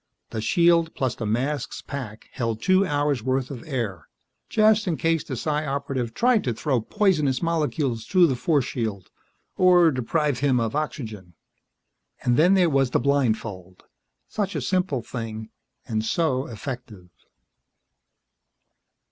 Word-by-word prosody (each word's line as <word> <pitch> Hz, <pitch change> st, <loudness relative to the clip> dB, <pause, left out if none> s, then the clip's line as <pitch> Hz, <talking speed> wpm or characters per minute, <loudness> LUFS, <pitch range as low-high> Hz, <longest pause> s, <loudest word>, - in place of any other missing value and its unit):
The 110 Hz, -, -3 dB
shield 170 Hz, -, +3 dB
plus 130 Hz, -2 st, -1 dB
the 110 Hz, -, -5 dB
mask's 130 Hz, +5 st, -2 dB
pack 125 Hz, -6 st, -7 dB
held 115 Hz, -4 st, -2 dB
two 185 Hz, +7 st, +3 dB
hours' 145 Hz, -4 st, 0 dB
worth 130 Hz, +2 st, -1 dB
of 125 Hz, -4 st, -7 dB
air 110 Hz, -, -3 dB, 0.4 s
just 215 Hz, -1 st, +3 dB
in 165 Hz, -4 st, 0 dB
case 165 Hz, +2 st, +1 dB
the 130 Hz, -, -5 dB
Psi 150 Hz, +5 st, -1 dB
Operative 135 Hz, -4 st, -3 dB
tried 240 Hz, -3 st, +3 dB
to 120 Hz, -3 st, -1 dB
throw 130 Hz, +1 st, 0 dB
poisonous 150 Hz, -, +1 dB
molecules 150 Hz, -8 st, -1 dB
through 185 Hz, -2 st, +5 dB
the 135 Hz, -6 st, +1 dB
force 140 Hz, +1 st, +1 dB
shield, 110 Hz, -8 st, -4 dB, 0.5 s
or 180 Hz, -3 st, +6 dB
deprive 140 Hz, +2 st, 0 dB
him 135 Hz, -3 st, +2 dB
of 115 Hz, +1 st, -2 dB
oxygen. 110 Hz, -, -5 dB, 0.9 s
And 120 Hz, -, +2 dB
then 175 Hz, +7 st, +5 dB
there 180 Hz, -2 st, +4 dB
was 135 Hz, -4 st, +2 dB
the -, -, +1 dB
blindfold. 110 Hz, -9 st, -1 dB, 0.4 s
Such 200 Hz, -2 st, -3 dB
a -, -, -1 dB
simple 180 Hz, -10 st, 0 dB
thing, 110 Hz, -3 st, -6 dB, 0.4 s
and 110 Hz, -3 st, -1 dB
so 135 Hz, +1 st, 0 dB
effective. 115 Hz, -6 st, -8 dB
135 Hz, 140 wpm, -24 LUFS, 115-165 Hz, 0.9 s, or